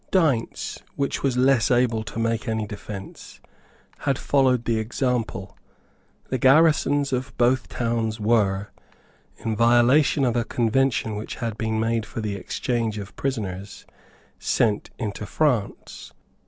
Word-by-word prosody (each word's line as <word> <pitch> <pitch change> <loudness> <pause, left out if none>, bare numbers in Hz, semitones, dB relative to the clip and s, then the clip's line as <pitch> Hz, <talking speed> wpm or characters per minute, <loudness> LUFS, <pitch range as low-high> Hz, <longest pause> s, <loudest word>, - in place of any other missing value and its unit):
Deynse, 150 -11 0 0.2
which 140 -1 -1
was 130 -3 0
less 130 -3 +3
able 120 -2 +2
to 115 - -8
make 115 +1 -1
any 110 -1 -1
defence, 100 -1 -9 0.6
had 140 -2 0
followed 130 -5 +2
the 115 -2 +1
example. 110 -4 -2 0.7
The 130 - -1
garrisons 145 0 +4
of 130 +1 -3
both 125 +1 +2
towns 115 -2 -1
were, 105 -3 +1 0.7
in 110 -1 -3
violation 120 +5 +4
of 120 -2 +1
a 120 - +2
convention 115 -1 +1
which 105 - -6
had 115 -3 -3
been 110 -1 -1
made 115 0 0
for - - -6
the 105 -2 -2
exchange 115 +2 -2
of 100 -1 -8
prisoners, 100 -7 -4 0.5
sent 105 -2 +1
into 105 -2 -4
France. 125 -6 -1
115 Hz, 130 wpm, -24 LUFS, 110-130 Hz, 0.7 s, garrisons